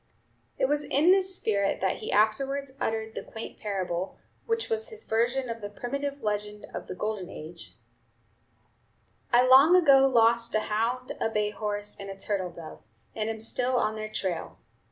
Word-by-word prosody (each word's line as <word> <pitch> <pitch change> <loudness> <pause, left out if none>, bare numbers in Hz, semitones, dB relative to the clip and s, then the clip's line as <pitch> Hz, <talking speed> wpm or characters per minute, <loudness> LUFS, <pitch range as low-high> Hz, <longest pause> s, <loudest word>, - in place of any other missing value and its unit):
It - - +2
was 295 +1 0
in 300 +7 +3
this 380 -1 +3
spirit 200 - 0
that 190 -1 0
he - - -5
afterwards 270 +6 +1
uttered 220 0 -2
the - - -5
quaint 225 - -9
parable, 185 -3 -3 0.3
which 455 0 0
was 450 +1 -2
his 445 -1 -8
version 245 +4 0
of 230 -1 -5
the 205 - -5
primitive 280 +6 -4
legend 210 0 -3
of - - -6
the - - -6
Golden 205 -2 -3
Age: 165 +1 -10 1.6
"I 245 +1 +5
long 270 +7 +7
ago 275 -6 +6
lost 235 -2 +3
a 215 - +3
hound, 230 +4 -1
a - - +1
bay 210 -1 0
horse, 210 -1 -3
and 200 0 -7
a 195 - -7
turtle 195 -2 -2
dove, 170 -2 -10 0.3
and 215 0 -2
am 220 0 -4
still 250 +3 +1
on 220 -2 +1
their 215 0 -5
trail. 185 -5 -3
225 Hz, 175 wpm, -28 LUFS, 210-270 Hz, 1.6 s, long